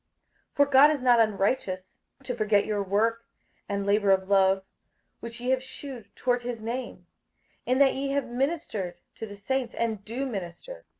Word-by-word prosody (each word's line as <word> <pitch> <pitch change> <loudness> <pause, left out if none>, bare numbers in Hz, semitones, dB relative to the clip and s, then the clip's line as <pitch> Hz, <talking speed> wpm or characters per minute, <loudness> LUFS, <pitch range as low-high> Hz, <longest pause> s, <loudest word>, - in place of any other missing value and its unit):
58:006:010 - - -46
For 285 - +5
God 285 +1 +7
is 300 -3 -1
not 245 -2 +5
unrighteous 195 -3 0 0.2
to 255 - -3
forget 210 -3 +2
your 210 -1 -1
work 225 +4 0 0.4
and 200 0 -2
labour 205 0 +2
of 190 -1 +3
love, 195 -1 +3 0.6
which 235 +1 -8
ye 250 +1 -1
have 260 -1 +2
shewed 260 -4 -9
toward 245 -1 0
his 240 -1 -4
name, 235 +4 -5 0.6
in 255 +1 +2
that 275 -1 +5
ye 275 +1 -2
have 280 -1 0
ministered 250 - -2 0.2
to 225 - -7
the 205 - -9
saints, 250 +4 -2
and 220 -4 -2
do 235 +6 -4
minister. 240 - -7
230 Hz, 175 wpm, -27 LUFS, 200-260 Hz, 0.6 s, God